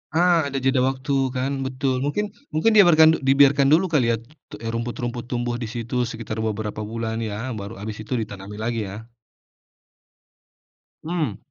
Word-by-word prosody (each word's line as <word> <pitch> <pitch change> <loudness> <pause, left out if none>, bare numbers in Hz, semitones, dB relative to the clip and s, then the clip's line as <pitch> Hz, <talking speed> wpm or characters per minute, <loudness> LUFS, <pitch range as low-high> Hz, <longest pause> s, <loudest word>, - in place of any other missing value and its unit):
Ah, 170 -3 +4
ada 140 - -6
jeda 135 0 +3
waktu 130 +2 -1 0.2
kan 130 +2 -1 0.2
betul 130 0 -1
mungkin 195 +10 -1 0.2
mungkin 160 +9 +3
dibiarkan 160 -6 +6
dibiarkan 140 0 +5
dulu 160 +6 +5
kali 145 -6 +3
ya - - +2 0.6
rumput-rumput 120 +1 -4
tumbuh 120 -1 -1
di 120 - -4
situ 120 +1 -5
sekitar 115 -1 -5
beberapa 110 -1 -3
bulan 110 +1 -3
ya 115 +3 -4
baru 100 +3 -7
habis 105 +1 -6
itu 110 - -5
ditanami 105 -3 -5
lagi 115 0 -1
ya. 110 +4 -9 1.9
Mmm. 155 - -2
125 Hz, 145 wpm, -23 LUFS, 110-140 Hz, 1.9 s, dibiarkan